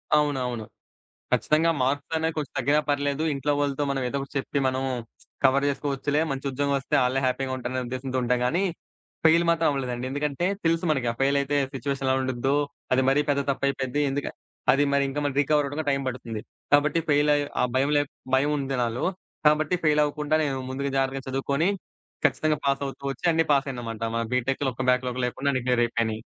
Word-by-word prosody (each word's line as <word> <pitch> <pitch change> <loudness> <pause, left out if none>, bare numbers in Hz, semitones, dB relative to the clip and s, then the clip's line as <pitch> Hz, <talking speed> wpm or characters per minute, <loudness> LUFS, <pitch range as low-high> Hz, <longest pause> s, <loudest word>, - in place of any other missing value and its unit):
అవునవును. 130 -6 0 0.7
ఖచ్చితంగా 160 +2 +3
మార్క్స్ 140 +4 -1
అనేవి 160 0 0
కొంచెం 150 -3 -3
తగ్గినా 145 +4 +3
పర్లేదు 145 0 0
ఇంట్లో 140 +2 0
వాళ్ళతో 145 0 0
మనం 135 -1 -1
ఏదో 140 - -3
ఒకటి 135 - -7
చెప్పి 135 - -2
మనం 130 0 0 0.6
కవర్ 135 +1 +4
చేసుకోవచ్చులే 145 +1 -1
మంచి 135 0 -3
ఉద్యోగమస్తే 140 0 -1
ఆళ్ళే 130 +2 +1
హ్యాపీగా 130 +1 0
ఉంటారనే 130 0 -3
ఉద్దేశంతో 130 +1 -3
ఉంటాం 125 +1 +1
కానీ 170 +9 +1 0.6
ఫెయిల్ 165 +1 +6
మాత్రం 165 -1 +2
అవ్వలేదండి. 125 -3 -3
ఎందుకంటే 145 +4 -1 0.2
తెలుసు 165 +1 +2
మనకి 135 -5 +1
ఆ - - -10
ఫెయిల్ 140 +1 +3
అయితే 140 +1 0 0.2
సిట్యుయేషన్ 135 0 -3
ఎలా 130 - +3
ఉండిద్దో, 130 +1 0 0.4
అది 130 +1 +4
మరీ 135 +2 +4
పెద్ద 140 0 +2
తప్పు 140 - -2
అయిపోద్ది 135 +1 -1
ఎందుకు 145 +1 -2 0.4
అది 140 +2 +3
మరి 140 0 +3
ఇంకా 140 +2 -3 0.2
రీకవర్ 145 +1 +2
అవ్వడానికి 145 +2 -3
టైం 135 0 +1
పడుతుంది. 120 -3 -5 0.3
కాబట్టి 145 +2 +4
ఫెయిల్ 145 0 +4
అయి, 145 0 +1 0.2
ఆ - - +3
భయం 135 +2 +2
లే 145 - +4 0.3
భయం 140 +3 +3
ఉంది 135 -1 -2
నాలో. 120 +1 -1 0.4
కాబట్టి 155 +3 +4
ఫెయిల్ 150 -1 +4
అవ్వకుండా 150 +1 0
నేను 140 -2 -1
ముందుగా 140 +1 -2
జాగ్రత్తగా 135 0 -1
చదువుకొని 140 +5 0 0.6
ఖచ్చితంగా 150 +2 +2
పాస్ 140 0 +1
అవుతూ 135 - -8
ఒచ్చి 135 - -5
అన్నీ 165 0 +3
పాసయినమంటా. 120 -5 -1
మా - - +1
బీటెక్‌లో 130 +2 0
ఒక్క - - -3
బ్యాక్‌లాగ్ 125 0 0
లేకుండా 135 +3 -1
అన్నీ 130 -2 -1
క్లియర్ 125 -1 +3
అయిపోయినయి. 115 -2 -1
140 Hz, 180 wpm, -26 LUFS, 130-145 Hz, 0.7 s, ఫెయిల్